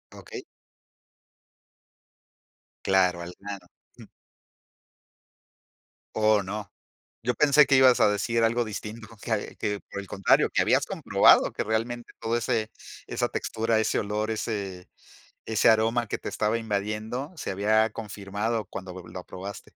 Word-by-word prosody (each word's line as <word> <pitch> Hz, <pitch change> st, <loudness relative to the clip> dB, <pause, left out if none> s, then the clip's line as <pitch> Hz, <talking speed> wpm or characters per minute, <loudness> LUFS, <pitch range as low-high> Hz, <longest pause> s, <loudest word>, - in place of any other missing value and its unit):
Okey. -, -, -9 dB, 2.4 s
Claro, 90 Hz, -2 st, +3 dB
al 85 Hz, +1 st, -7 dB
grano. 100 Hz, -3 st, -8 dB, 0.3 s
Ujú. -, -, -13 dB, 2.1 s
Oh, 110 Hz, -1 st, +4 dB
no. 100 Hz, +1 st, -6 dB, 0.5 s
Yo 125 Hz, +1 st, 0 dB
pensé 150 Hz, 0 st, +5 dB
que 135 Hz, -, +4 dB
ibas 130 Hz, -1 st, +6 dB
a -, -, +6 dB
decir 115 Hz, +3 st, 0 dB
algo 120 Hz, +2 st, +2 dB
distinto, 110 Hz, +1 st, -7 dB
que 110 Hz, -3 st, -3 dB
que, 105 Hz, -1 st, -2 dB
por 100 Hz, -, -4 dB
el 100 Hz, -, -10 dB
contrario, 95 Hz, +1 st, +3 dB
que -, -, +3 dB
habías -, -, +2 dB
comprobado -, -, +4 dB
que -, -, -3 dB
realmente 115 Hz, +2 st, -2 dB
todo 115 Hz, +1 st, -1 dB
ese 115 Hz, -2 st, -1 dB, 0.4 s
esa -, -, -1 dB
textura, 115 Hz, 0 st, -1 dB
ese 110 Hz, -, +1 dB
olor, 105 Hz, +1 st, -2 dB
ese 100 Hz, -5 st, -4 dB, 0.6 s
ese 110 Hz, -1 st, +3 dB
aroma 115 Hz, +1 st, +2 dB
que -, -, -3 dB
te -, -, -6 dB
estaba 110 Hz, +2 st, 0 dB
invadiendo 110 Hz, -, -3 dB
se 150 Hz, -, -4 dB
había 110 Hz, +3 st, +2 dB
confirmado 105 Hz, +1 st, -3 dB
cuando 95 Hz, -1 st, -8 dB
lo 90 Hz, -1 st, -10 dB
lo 90 Hz, -1 st, -8 dB
probaste. 95 Hz, +2 st, -8 dB
110 Hz, 135 wpm, -26 LUFS, 100-115 Hz, 2.4 s, ibas